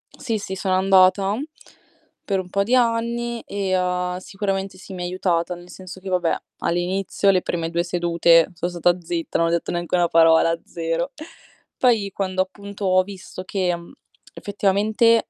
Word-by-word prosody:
Sì, 225 -3 -2
sì, 190 -1 -5
sono 190 0 0
andata 195 +1 +4 0.9
per 195 -2 0
un 180 - -6
po' 200 +2 +1
di 240 +5 +2
anni 235 0 0
e, 195 -2 -2
ha 180 0 -1
sicuramente 195 0 -3
sì 190 +1 -11
mi 180 -1 -5
aiutata, 180 -1 -1
nel 175 +1 -14
senso 185 +1 -10
che, 190 +1 -7
va 180 -1 +2
beh, 170 - 0 0.2
all'inizio 185 +3 0
le 185 -2 +4
prime 165 -2 -2
2 170 +1 0
sedute 170 -1 +3
so' 170 +1 -3
stata 175 0 +2
zitta, 170 -1 -3
non 165 - +2
ho - - +1
detto 170 - -1
neanche 175 0 -1
1 175 -1 +3
parola, 165 0 +4
0. 165 +6 -3 0.7
Poi, 220 -6 +2
quando 185 -1 -1
appunto 200 +1 -6
ho 185 0 +4
visto 185 -1 -9
che 185 -2 -1
mhmm, 170 0 -11 0.4
effettivamente 210 +3 +2
185 Hz, 170 wpm, -22 LUFS, 175-200 Hz, 0.9 s, andata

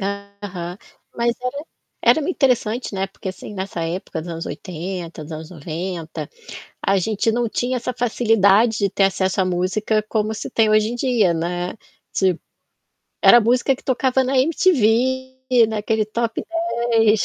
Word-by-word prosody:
Aham. 200 -3 -5 0.4
Mas 235 0 +1
era 280 +4 -4 0.4
era 315 +2 +4
interessante, 245 - 0
né, 195 0 -1
porque 190 0 -8
assim, 185 +3 -7
nessa 190 -3 -4
época 165 -1 -4
dos 170 - -7
anos 165 0 -5
80, 175 -1 -6
dos 150 - -11
anos 155 0 -7
90, 165 +1 -5 0.5
a 195 0 +2
gente 215 +3 +1
não 240 0 0
tinha 250 +3 -1
essa 250 +1 -3
facilidade 225 -2 +3
de 200 -1 +2
ter 195 +1 0
acesso 190 0 +1
à - - +3
música 185 +4 0
como 215 -1 0
hoje 215 0 +2
em - - -3
dia, 235 -8 +2
né, 175 +4 -3 0.4
tipo, 185 -3 +1 0.8
era 240 - +9
a - - +4
música 250 +4 +2
que 255 - -15
tocava 260 0 +1
na 260 +1 +1
MTV, 260 - +2
naquele 220 0 0
top 230 +1 -2 0.5
10, 220 -2 +4
215 Hz, 150 wpm, -21 LUFS, 185-240 Hz, 0.8 s, era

